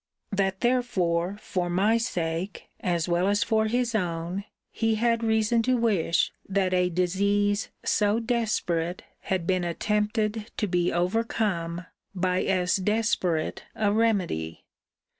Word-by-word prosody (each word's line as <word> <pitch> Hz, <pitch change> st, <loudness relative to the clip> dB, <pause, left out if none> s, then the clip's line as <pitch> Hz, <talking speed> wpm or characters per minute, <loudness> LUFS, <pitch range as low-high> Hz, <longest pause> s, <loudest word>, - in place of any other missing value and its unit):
'That 195 Hz, -1 st, 0 dB
therefore 200 Hz, -8 st, +1 dB
for 180 Hz, -4 st, -2 dB
my 195 Hz, +6 st, +3 dB
sake, 185 Hz, -6 st, -2 dB
as 175 Hz, -2 st, 0 dB
well 175 Hz, +2 st, +2 dB
as 205 Hz, +1 st, +2 dB
for 220 Hz, -1 st, +1 dB
his 240 Hz, +1 st, 0 dB
own, 175 Hz, -1 st, -2 dB, 0.3 s
he 225 Hz, -1 st, +1 dB
had 230 Hz, +1 st, +1 dB
reason 220 Hz, +1 st, +2 dB
to 255 Hz, +2 st, +2 dB
wish 200 Hz, -8 st, +1 dB, 0.2 s
that 190 Hz, -1 st, +1 dB
a 180 Hz, 0 st, +3 dB
disease 200 Hz, +4 st, +1 dB, 0.2 s
so 210 Hz, +1 st, +2 dB
desperate 215 Hz, -8 st, -1 dB, 0.2 s
had 185 Hz, -3 st, -2 dB
been 185 Hz, 0 st, +1 dB
attempted 210 Hz, +4 st, -1 dB
to -, -, +1 dB
be 180 Hz, -2 st, +1 dB
overcome 180 Hz, -3 st, -1 dB, 0.3 s
by 180 Hz, 0 st, +1 dB
as 185 Hz, -1 st, +1 dB
desperate 190 Hz, -5 st, 0 dB
a 210 Hz, -2 st, +1 dB
remedy. 185 Hz, -, 0 dB
200 Hz, 125 wpm, -26 LUFS, 175-220 Hz, 0.3 s, my